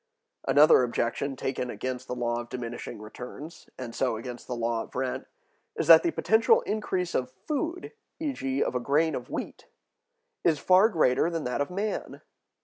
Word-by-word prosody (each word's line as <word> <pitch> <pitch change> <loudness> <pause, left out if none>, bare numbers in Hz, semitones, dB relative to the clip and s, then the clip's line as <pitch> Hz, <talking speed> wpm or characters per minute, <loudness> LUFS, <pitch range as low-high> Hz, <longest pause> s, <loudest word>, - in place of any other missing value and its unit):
Another 150 -1 +7
objection 125 +3 -1
taken 130 -1 -3
against 130 +3 -4
the 125 - -3
law 120 -1 -1
of 120 - -11
diminishing 120 -2 -6
returns, 125 +8 -10
and 120 -3 -6
so 125 -3 0
against 120 +2 -8
the 125 - -3
law 115 -1 -1
of - - -11
rent, 130 0 -2 0.5
is - - -1
that - - +9
the 345 - +1
potential 330 - +3
increase 190 - -2
of 125 -1 0 0.2
food, 335 +4 -2 0.3
e.g., 140 - -1
of - - -2
a 125 - 0
grain 150 +6 +2
of 125 -2 -5
wheat, - - -6 0.8
is 160 -3 +3
far 185 +8 +5
greater 160 - +2
than 165 -2 -3
that 125 +2 -1
of 145 - -1
man. 200 +4 -4
130 Hz, 170 wpm, -27 LUFS, 125-175 Hz, 0.8 s, that